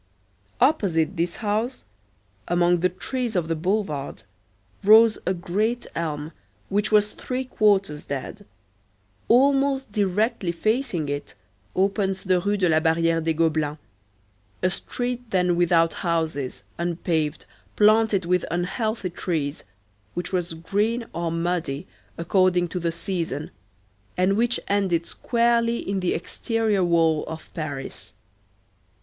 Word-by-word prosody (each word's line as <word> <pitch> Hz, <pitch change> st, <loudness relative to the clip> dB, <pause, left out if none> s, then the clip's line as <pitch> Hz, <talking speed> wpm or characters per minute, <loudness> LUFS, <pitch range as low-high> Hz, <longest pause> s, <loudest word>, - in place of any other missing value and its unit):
Opposite 185 Hz, -, +2 dB
this 170 Hz, 0 st, -1 dB
house, 220 Hz, +4 st, -2 dB, 0.6 s
among 175 Hz, 0 st, +3 dB
the 180 Hz, +2 st, +2 dB
trees 235 Hz, +5 st, -3 dB
of 175 Hz, -3 st, +1 dB
the 165 Hz, -, 0 dB
boulevard, 175 Hz, -5 st, -2 dB, 0.6 s
rose 220 Hz, +2 st, +7 dB
a 185 Hz, -, +3 dB
great 210 Hz, +7 st, -1 dB
elm 155 Hz, -2 st, -3 dB, 0.4 s
which 205 Hz, +2 st, 0 dB
was 210 Hz, 0 st, +4 dB
three 255 Hz, +1 st, -4 dB
quarters 200 Hz, -10 st, +1 dB
dead; 140 Hz, -2 st, -5 dB, 0.8 s
almost 270 Hz, 0 st, +3 dB
directly 205 Hz, -1 st, 0 dB
facing 215 Hz, -, 0 dB
it 145 Hz, 0 st, -4 dB, 0.4 s
opens 195 Hz, 0 st, 0 dB
the 185 Hz, -2 st, +2 dB
Rue 205 Hz, +3 st, 0 dB
de 185 Hz, -2 st, +2 dB
la 160 Hz, -1 st, +4 dB
Barrière 165 Hz, 0 st, +2 dB
des 160 Hz, 0 st, +1 dB
Gobelins, 155 Hz, -2 st, +1 dB, 0.9 s
a 185 Hz, -, +3 dB
street 245 Hz, +5 st, -3 dB
then 180 Hz, -2 st, +2 dB
without 170 Hz, -1 st, +3 dB
houses, 160 Hz, -, -2 dB, 0.2 s
unpaved, 165 Hz, -3 st, -1 dB, 0.3 s
planted 215 Hz, -3 st, +4 dB
with 180 Hz, 0 st, +2 dB
unhealthy 195 Hz, +3 st, -2 dB
trees, 160 Hz, -4 st, -3 dB, 0.5 s
which 180 Hz, +1 st, -4 dB
was 175 Hz, -2 st, -1 dB
green 210 Hz, +8 st, -1 dB
or 170 Hz, -1 st, -2 dB
muddy 165 Hz, -4 st, -2 dB, 0.3 s
according 180 Hz, +1 st, +2 dB
to 180 Hz, -, -3 dB
the 170 Hz, -1 st, -1 dB
season, 165 Hz, -4 st, -3 dB, 0.7 s
and 185 Hz, +2 st, +3 dB
which 240 Hz, +2 st, +1 dB
ended 190 Hz, -5 st, +1 dB
squarely 235 Hz, +1 st, +1 dB
in 195 Hz, -3 st, -2 dB
the 180 Hz, -1 st, 0 dB
exterior 220 Hz, +2 st, 0 dB
wall 165 Hz, -3 st, +3 dB
of 160 Hz, 0 st, -8 dB
Paris. 145 Hz, -5 st, -5 dB
180 Hz, 120 wpm, -24 LUFS, 165-215 Hz, 0.9 s, rose